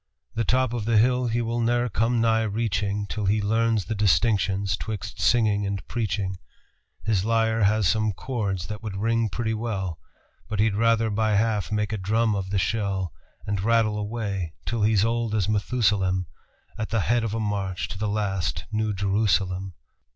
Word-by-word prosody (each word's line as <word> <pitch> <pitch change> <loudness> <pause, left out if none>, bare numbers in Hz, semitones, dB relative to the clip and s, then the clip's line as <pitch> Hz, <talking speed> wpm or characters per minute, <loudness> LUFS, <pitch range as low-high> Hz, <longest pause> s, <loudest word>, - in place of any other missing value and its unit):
The 115 - 0
top 125 +1 +1
of 115 -3 -2
the 115 -1 +3
hill 125 +2 +3
he 120 +1 0
will 115 +1 -2
ne'er 120 +1 +2
come 115 +2 +1
nigh 115 -1 +3
reaching 105 -2 -1
Till 105 0 -3
he 105 +2 +3
learns 110 0 +1
the - - -2
distinctions 100 0 +2
'twixt 105 +6 -6
singing 110 -4 +3
and 100 -1 -3
preaching; 100 -5 -2 0.6
His 100 -4 +1
lyre 115 -1 +2
has 105 -1 +3
some 110 +2 +2
chords 100 -4 -3
that 105 +5 -6
would 105 -4 -5
ring 115 +2 +1
pretty 110 0 -2
well, 100 -7 -3 0.5
But 105 -1 -3
he'd 110 0 +3
rather 115 +1 +2
by 110 0 +1
half 105 -1 +1
make 105 0 0
a 110 - -2
drum 110 +4 +1
of 95 -1 -3
the 100 - 0
shell, 95 -1 -1 0.3
And 100 -2 -1
rattle 110 0 +2
away 100 -6 -3
till 115 -2 -1
he's 105 -1 +3
old 115 -1 0
as 100 -4 +2
Methusalem 100 -4 +1 0.5
At 110 - -2
the 115 -1 +1
head 120 +3 +1
of 110 -1 -2
a - - -1
march 100 -3 -2
to 95 - -7
the 105 0 -1
last 100 -6 -1
New 110 -1 0
Jerusalem." 95 -2 0
105 Hz, 180 wpm, -25 LUFS, 100-115 Hz, 0.6 s, the